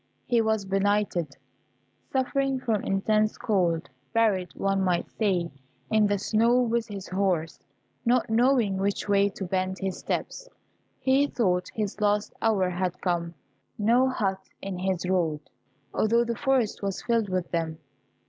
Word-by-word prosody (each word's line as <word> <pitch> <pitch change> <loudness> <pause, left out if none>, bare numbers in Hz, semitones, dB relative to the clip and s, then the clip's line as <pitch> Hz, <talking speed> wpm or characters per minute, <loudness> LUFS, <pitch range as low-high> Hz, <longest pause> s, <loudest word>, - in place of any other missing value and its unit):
He 240 -2 +3
was 220 -2 0
benighted, 195 -6 0 0.7
suffering 270 0 0
from 225 -5 -1
intense 215 +2 +1
cold, 175 -6 0 0.3
buried, 205 -6 +2
one 195 -1 0
might 180 -2 0
say, 180 -6 0 0.4
in 215 -1 +4
the 205 0 +1
snow, 230 +5 +3
with 235 -1 +1
his 200 -3 -7
horse; 180 -5 0 0.4
not 245 0 +2
knowing 230 -3 +3
which 200 +2 -1
way 200 0 +3
to 195 0 -6
bend 185 +1 -1
his 190 -1 -3
steps, - - -4 0.5
he 265 +2 +3
thought 180 -9 0
his 210 -1 -3
last 205 0 +1
hour 210 -5 +2
had 180 0 -2
come: 170 -2 -1 0.4
no 240 +5 +3
hut 195 -7 -1 0.2
in 195 -2 -5
his 185 -1 -1
road, 165 -5 +1 0.5
although 230 +2 +3
the 235 0 -2
forest 265 -5 +1
was 195 -2 -3
filled 230 -4 +1
with 185 -1 -2
them. 165 -2 -2
200 Hz, 145 wpm, -27 LUFS, 185-230 Hz, 0.7 s, in